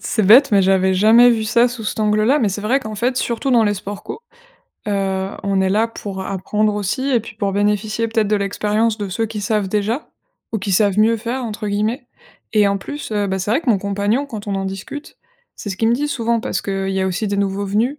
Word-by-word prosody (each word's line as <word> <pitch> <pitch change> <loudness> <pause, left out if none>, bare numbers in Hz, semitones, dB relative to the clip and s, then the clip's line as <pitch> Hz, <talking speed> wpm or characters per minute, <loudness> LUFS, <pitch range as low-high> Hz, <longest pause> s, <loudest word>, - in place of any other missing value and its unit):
c'est 215 -4 0
bête, 255 +8 +7
mais 200 -2 +4
j'avais 190 0 +3
jamais 225 +5 +6
vu 220 -2 0
ça 235 +2 +3
sous 235 -2 -7
cet 215 - -3
angle 215 0 +2
là. 280 +6 +3
Mais 215 - +2
c'est 200 +2 -4
vrai 245 +6 +1
qu'en 215 -4 -7
fait, 245 +4 0
surtout 240 +2 -1
dans 235 -2 +5
les 205 -1 +1
sports 200 +1 -7
co, - - -7 0.7
heu, 195 -1 -1
on 195 -1 0
est 190 - +2
là 215 +4 +2
pour 200 -4 -7
apprendre 210 +2 -1
aussi 210 +7 -2
et 240 -3 +3
puis 220 0 -11
pour 200 -2 -1
bénéficier 210 +3 0
peut-être 220 -2 0
de 210 - +2
l'expérience 210 +2 0
de 205 -3 -4
ceux 225 +4 -1
qui 215 -1 -6
savent 205 -1 0
déjà 215 +7 -1 0.4
ou 220 - -2
qui 190 0 -3
savent 200 +1 +2
mieux 225 +1 +4
faire 245 +3 -3
entre 215 -1 -4
guillemets. 220 +6 -1 0.5
Et 210 -1 +5
en 200 0 0
plus, 290 +3 -7
heu, 205 -1 0
bah, 190 0 -2
c'est 190 +2 -3
vrai 255 +8 +2
que 280 - -6
mon 220 - +5
compagnon, 205 +7 -1
quand 220 -7 -8
on 200 - -2
en 195 0 -2
discute, 195 +10 -7 0.4
c'est 205 - -8
ce 190 - -4
qu'il 225 +3 +1
me 235 - +3
dit 295 +3 -1
souvent, 235 -3 0
parce - - -3
qu'il 195 -1 -2
y 190 0 -1
a 190 - 0
aussi 190 +4 -2
des 200 - -1
nouveaux 200 0 -1
venus. 230 +9 0
210 Hz, 250 wpm, -19 LUFS, 200-230 Hz, 0.7 s, bête